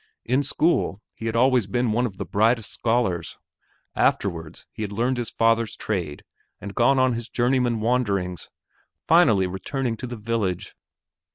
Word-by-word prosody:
In 130 +4 +2
school, 140 - +1
he 115 - -6
had 115 - -2
always 125 -3 +3
been 120 +3 0
one 120 +3 +1
of 95 -4 -11
the - - -4
brightest 110 +1 +1
scholars. 115 - -1 0.6
Afterwards, 85 -4 -1
he - - -8
had 105 -2 -3
learned 120 +5 0
his 120 -2 -3
father's 115 -1 +1
trade 85 -9 -3 0.4
and 100 - -7
had - - -18
gone 130 +3 +4
on 130 -1 +3
his 115 0 -5
journeyman 120 -2 +1
wanderings, 100 -7 -1 0.6
finally 95 -1 +5
returning 115 +7 -3
to 125 - -6
the 120 0 -6
village. 105 -4 -2
115 Hz, 160 wpm, -24 LUFS, 100-125 Hz, 0.6 s, finally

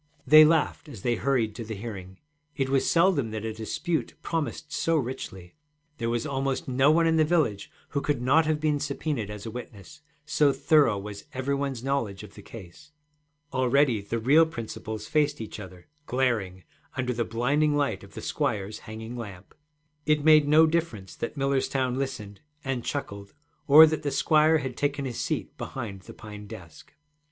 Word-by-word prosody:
They 155 +3 +9
laughed 155 -1 +1
as 115 -9 -10
they 120 - +2
hurried 120 -3 0
to 115 - -6
the 110 0 -6
hearing: 95 -3 -8 0.4
it 135 -2 -1
was 135 -1 +2
seldom 165 -8 +3
that 110 0 -5
a 110 - -3
dispute 135 +10 -3
promised 155 -1 -3
so 165 - +1
richly. 120 - -5 0.5
There 115 -1 -1
was 120 +3 -1
almost 135 -2 -2
no 135 +2 +3
one 165 +2 +4
in 165 0 +3
the 155 - +5
village 150 - 0 0.2
who 140 - -2
could 145 -2 -1
not 145 +6 +3
have 155 -1 +1
been 150 -1 +1
subpœnaed 140 -5 -3
as 105 0 -7
a 110 - -5
witness, 120 +4 -10 0.2
so 150 -1 +3
thorough 145 -10 +3
was 100 0 -8
every 130 +2 -1
one's 140 -3 -3
knowledge 115 -8 -2
of 105 - -12
the 105 - -12
case. 110 - -13 0.6
Already 130 -3 +2
the 100 +4 -3
real 145 +8 +5
principals 110 -5 -6
faced 150 0 +1
each 110 -1 -7
other, 90 -3 -11 0.2
glaring, 110 -8 -1 0.3
under 125 -1 -1
the 120 0 -1
blinding 145 +7 +1
light 140 -10 -1
of 100 - -15
the - - -7
squire's 110 -8 -2
hanging 110 +2 -7
lamp. 100 -5 -9 0.5
It 150 -1 +2
made 155 -2 +6
no 155 +2 +6
difference 155 - -2
that 115 - -5
Millerstown 135 -2 0
listened 105 -7 -5 0.2
and 135 -4 -2
chuckled 100 -8 -5 0.3
or 155 +2 +10
that 155 0 -1
the 145 - -1
squire 155 +2 +4
had 130 -4 -4
taken 140 0 -1
his 125 -3 -4
seat - - -3
behind 110 -7 -6
the - - -12
pine 105 -1 -10
desk. 90 -8 -12
130 Hz, 180 wpm, -27 LUFS, 110-150 Hz, 0.6 s, or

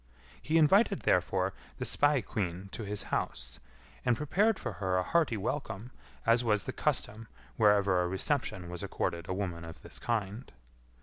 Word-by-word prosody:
He 160 +2 +2
invited, 195 +6 +5
therefore, 95 +1 +2 0.2
the - - -3
spae 145 -2 +3
queen 95 -1 -3
to - - -5
his 105 -1 -3
house, - - -2 0.4
and 120 - +2
prepared 195 - +2
for - - -4
her 95 -1 +1
a 90 - +2
hearty 155 - +2
welcome, 110 0 -3 0.3
as 115 +1 +4
was 105 -3 +2
the - - -4
custom 110 +2 -1 0.3
whereever 100 -4 +4
a 90 - 0
reception 95 - -1
was 90 - -5
accorded 85 0 -3
a - - 0
woman 90 -4 -3
of 80 0 -10
this 75 -3 -8
kind. 110 - -2
105 Hz, 165 wpm, -31 LUFS, 90-125 Hz, 0.4 s, invited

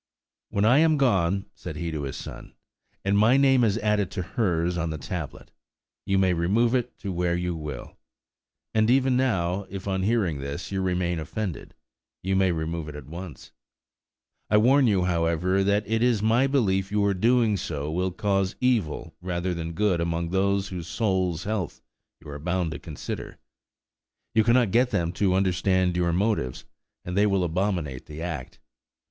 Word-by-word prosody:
"When 100 +1 +1
I 125 +6 +6
am 160 -1 +4
gone," 100 -8 +2
said - - -8
he 85 -1 -3
to 75 -2 -3
his 65 - -5
son, - - -9 0.5
"and 100 +1 +2
my 110 +6 +5
name 135 -2 +4
is 110 -2 +2
added 105 -4 +1
to 90 - -3
hers 90 -4 0
on 85 -1 -1
the 80 - -4
tablet, 80 0 -6 0.6
you 95 -1 +2
may 95 -1 +3
remove 105 +8 +2
it 125 -2 -1
to 100 - -3
where 85 0 0
you 90 0 -2
will; 75 -5 -7 0.7
and 110 0 +3
even 130 0 +3
now, 95 -7 0
if, 95 0 -7
on 95 -1 0
hearing 95 -7 +1
this, 70 +6 -5
you 95 -1 -1
remain 90 -2 0
offended, 90 +3 -5 0.5
you 95 +1 0
may 95 -1 +3
remove 80 -1 -3
it 75 - -9
at 75 -3 -8
once. 85 -1 -9 1.0
I 105 - +5
warn 130 +5 +5
you, 100 -4 +2
however, 90 +2 +1
that 100 +1 +1
it 110 +1 0
is 120 -4 +2
my 115 +5 +3
belief 100 -8 +1
your 100 -1 +2
doing 115 +2 +3
so 75 -5 -4
will 90 +3 0
cause 95 +1 0
evil 115 -12 0
rather 90 0 -2
than 85 -1 -4
good 95 -2 +1
among 85 0 -1
those 100 +1 +1
whose 90 -3 -6
souls' 90 -2 0
health 105 -6 -3 0.4
you 80 - -15
are 75 0 -7
bound 90 +1 -1
to - - -6
consider. 80 -5 -7 1.0
You 110 -1 +4
cannot 120 -2 +3
get 125 +3 +3
them 85 -5 0
to 95 0 +1
understand 95 -1 +1
your 85 -1 +1
motives, 90 - -1 0.4
and 90 - -4
they 105 +1 +4
will 100 -2 +1
abominate 85 -6 -2
the 75 +2 -7
act. 80 -8 -5
95 Hz, 175 wpm, -26 LUFS, 85-105 Hz, 1.0 s, I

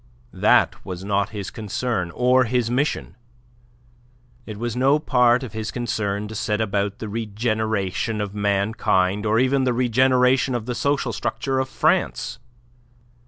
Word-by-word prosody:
That - - +3
was 90 0 -7
not 100 0 0
his 105 -3 -6
concern 110 -3 -3
or 125 +1 +4
his 120 0 0
mission. 140 +4 -1 1.3
It 110 -2 -7
was 120 +1 -3
no 135 +4 +3
part 125 -4 +3
of 120 - -7
his 110 -1 -4
concern 105 -4 -2
to 110 - -8
set 105 0 -1
about 100 -2 -1
the 110 - -6
regeneration 110 -1 -2
of 100 -1 -3
mankind, 100 -1 +1
or 110 +1 +2
even 130 +2 +2
the 125 -1 +1
regeneration 125 +1 +3
of 115 -3 -3
the 125 - -3
social 140 +3 0
structure 135 -1 -2
of 130 0 -2
France. - - 0
110 Hz, 145 wpm, -22 LUFS, 105-125 Hz, 1.3 s, or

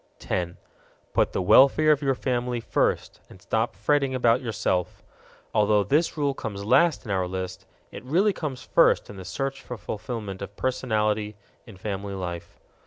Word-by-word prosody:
10. 85 -1 -3 0.6
Put - - +2
the 95 - -1
welfare 140 +9 +6
of 150 -1 +2
your 135 -2 +1
family 125 -1 -1
first, 115 - -1
and - - -14
stop 110 +5 -1
fretting 140 -3 +1
about 120 0 +3
yourself. 95 -6 -2 0.5
Although 105 -1 +3
this 150 - +1
rule 145 -2 +1
comes 100 -6 -6
last 145 +8 +3
in 105 - -4
our 95 -2 0
list, 95 +1 -5 0.2
it - - -9
really 185 +11 +2
comes 135 -7 -5
first - - +3
in 100 - -11
the 95 - -8
search 135 +8 -3
for 125 - -7
fulfillment 105 0 -6
of 100 0 -8
personality 110 -4 0 0.3
in 110 -5 -12
family 100 0 -4
life. 85 -2 -6
110 Hz, 165 wpm, -25 LUFS, 95-130 Hz, 0.6 s, welfare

